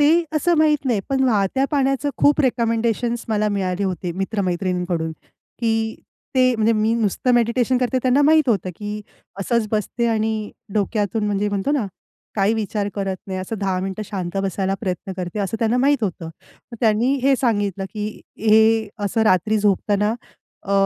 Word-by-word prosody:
ते 325 +4 +4
असं 345 +4 +2
माहीत 300 -2 +3
नाही. 230 -5 +1
पण 270 -1 +1
वाहत्या 220 +2 +2
पाण्याचं 275 -1 +1
खूप 290 +1 +4
रिकमेंडेशन्स 235 -2 0
मला 215 -1 +1
मिळाले 195 -1 -1
होते 180 -2 -3
मित्र-मैत्रिणींकडून, 180 -4 -1 0.5
की 225 -1 0 0.4
ते 255 -1 +4
म्हणजे 225 0 +2
मी 220 +1 +1
नुसतं 230 +2 +1
मेडिटेशन 240 +2 +2
करते 255 +1 +1
त्यांना 260 +2 +3
माहीत 310 -1 +4
होतं 195 -5 +1
की 210 0 -5 0.4
असंच 230 +2 +1
बसते 225 +2 -1
आणि 220 -1 -1 0.2
डोक्यातून 210 +1 0
म्हणजे 205 0 0
म्हणतो 200 +5 -1
ना, 260 -9 0 0.5
काही 205 +1 +2
विचार 210 -2 -2
करत 195 -2 -2
नाही, 190 -1 -4
असं 205 +4 -5
10 190 -2 -1
मिनिटं 190 +2 -4
शांत 185 -2 -4
बसायला 195 0 -1
प्रयत्न 185 0 -3
करते 180 +2 -4
असं 200 +3 -2
त्यांना 230 +2 +1
माहीत 275 0 +2
होतं. 175 -4 -4
मग 165 +8 -14
त्यांनी 230 +4 +3
हे 275 +1 +4
सांगितलं 205 -6 0
की 210 -1 -2 0.3
हे 220 0 +4 0.2
असं 210 +3 +1
रात्री 215 +1 +3
झोपताना 205 +1 +1 0.5
अ, 200 - -3
215 Hz, 160 wpm, -21 LUFS, 195-240 Hz, 0.5 s, ते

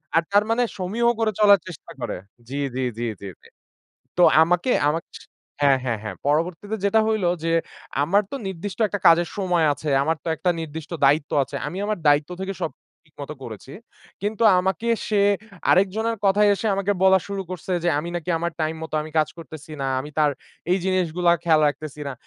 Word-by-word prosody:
আর 165 - +4
তার 205 +1 +5
মানে 240 +2 +2
সমীহ 200 +6 -1
করে 220 -1 +2
চলার 200 -2 +7
চেষ্টা 170 - -10
করে। - - -3 0.3
জি, 140 - -5 0.2
জি, 130 - -1 0.2
জি, 120 - -1 0.2
জি, 100 - -6
জি। - - -18 0.7
তো 180 - +4 0.2
আমাকে 175 +8 +1 0.2
আমা 160 +2 +1 0.2
স - - -8 0.4
হ্যাঁ, 140 -2 +4
হ্যাঁ, 115 -4 -1
হ্যাঁ। 110 - -5
পরবর্তীতে 170 +8 0
যেটা 210 +2 +4
হইলো 215 -5 +1 0.2
যে 165 - 0 0.5
আমার 195 +8 +3
তো - - -4
নির্দিষ্ট 190 +2 -5
একটা 205 - -4
কাজের 170 +1 +6
সময় 180 -4 +1
আছে, 150 +2 -6
আমার 160 +2 0
তো - - -3
একটা 180 - +1
নির্দিষ্ট 160 -1 -7
দায়িত্ব 145 +2 +3
আছে। 140 +1 -5
আমি 175 +6 -5
আমার 210 -3 -1
দায়িত্ব 145 +2 +4
থেকে 195 +1 -3
সব 160 - -1 0.3
ঠিক 155 -2 -30
মতো 150 +2 -6
করেছি। 115 +3 -9 0.5
কিন্তু 210 +2 -2 0.2
আমাকে 190 +5 -1 0.2
সে 210 -3 +2 0.5
আরেকজনের 220 +5 +2
কথায় 205 +1 +4
এসে 200 +3 -4
আমাকে 200 +1 0
বলা 190 0 +6
শুরু 200 -1 -3
করছে 185 +1 -5
যে, - - +3
আমি 170 - -4
নাকি 175 +1 -4
আমার 170 +1 -2
time 155 +1 -1
মতো 160 -1 -6
আমি 155 - -9
কাজ 155 - +2
করতেছি 155 0 -10
না। 135 - -1
আমি 145 +3 -8
তার 150 -1 +4 0.4
এই 185 - +3
জিনিসগুলা 180 -2 +1
খেয়াল 160 -3 +4
রাখতেছি 150 0 -6
না। - - -4
175 Hz, 195 wpm, -23 LUFS, 155-200 Hz, 0.7 s, চলার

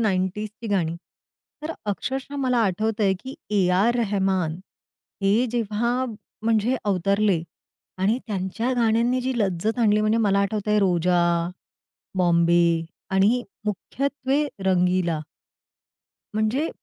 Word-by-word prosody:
90s 195 0 0
ची 230 - -6
गाणी. 175 -5 0 0.7
तर 315 - -3 0.2
अक्षरशः 265 +7 -4
मला 255 -3 +1
आठवतं 215 +3 0
आहे, 190 -1 +3
की 260 +1 -8 0.2
ए. 195 -4 +3
आर. 200 +6 +3
रेहमान 190 -6 0 0.7
हे 210 +6 +3
जेव्हा 235 +2 0 0.4
म्हणजे 225 +3 +2
अवतरले 200 -1 +2 0.6
आणि 205 +6 +2
त्यांच्या 205 +4 -2
गाण्यांनी 235 +2 +2
जी 260 +1 -1
लज्जत 210 +3 0
आणली. 215 -2 +4
म्हणजे 215 +1 +2
मला 195 - +3
आठवतं 210 +1 -1
आहे 210 - +4
रोजा, 180 -2 +2 1.0
बॉम्बे 170 -1 +4 0.5
आणि 220 +6 +3 0.2
मुख्यत्वे 275 +7 -1 0.2
रंगीला. 180 -3 +2 1.2
म्हणजे 220 +9 +1
210 Hz, 115 wpm, -24 LUFS, 185-235 Hz, 1.2 s, आणली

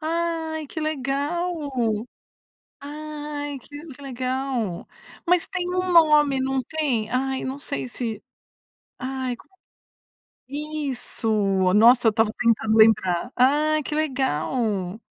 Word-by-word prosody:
Ai 320 -1 -2
que 315 - -6
legal, 305 +2 -2 1.1
ai 295 0 -6
que 290 +1 -11
legal, 255 -6 -3 0.4
mas 355 0 +3
tem 360 -2 -3
um 365 0 0
nome 300 -5 +5
não 265 0 0
tem? 255 -7 -1
Ai 265 +1 -1
não 265 +2 -4
sei, 135 - -4
se 220 - -4 0.8
ai 260 -1 -3
como 380 - -21 0.9
isso, 285 -5 -2 0.4
nossa, 235 +2 +6
eu - - +6
estava 220 0 +1
tentando 220 -2 +2
lembrar 220 -1 +4
ai 300 +4 +3
que 300 - -4
legal. 230 - -1
270 Hz, 105 wpm, -24 LUFS, 240-305 Hz, 1.1 s, nossa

